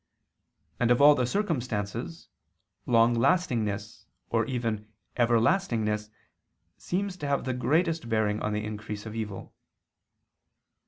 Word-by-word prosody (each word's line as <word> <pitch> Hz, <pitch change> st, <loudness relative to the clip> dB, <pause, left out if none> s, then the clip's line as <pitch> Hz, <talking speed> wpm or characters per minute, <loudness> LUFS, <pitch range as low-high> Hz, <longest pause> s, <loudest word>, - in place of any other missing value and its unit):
And 120 Hz, -, +2 dB
of 125 Hz, -, +4 dB
all 145 Hz, +1 st, +8 dB
the 125 Hz, -4 st, 0 dB
circumstances, 125 Hz, -, -3 dB, 0.6 s
longlastingness, 115 Hz, -, +1 dB, 0.3 s
or -, -, +1 dB
even 115 Hz, -4 st, -2 dB, 0.3 s
everlastingness, 115 Hz, -, +1 dB, 0.7 s
seems 195 Hz, +1 st, -3 dB
to 145 Hz, -, -4 dB
have 140 Hz, 0 st, 0 dB
the 130 Hz, -, -2 dB
greatest 160 Hz, +1 st, 0 dB
bearing 110 Hz, -2 st, +1 dB
on 105 Hz, -, -1 dB
the 105 Hz, 0 st, -2 dB
increase 105 Hz, 0 st, -6 dB
of 110 Hz, -, -6 dB
evil. 105 Hz, -3 st, -6 dB
120 Hz, 110 wpm, -28 LUFS, 105-145 Hz, 0.7 s, all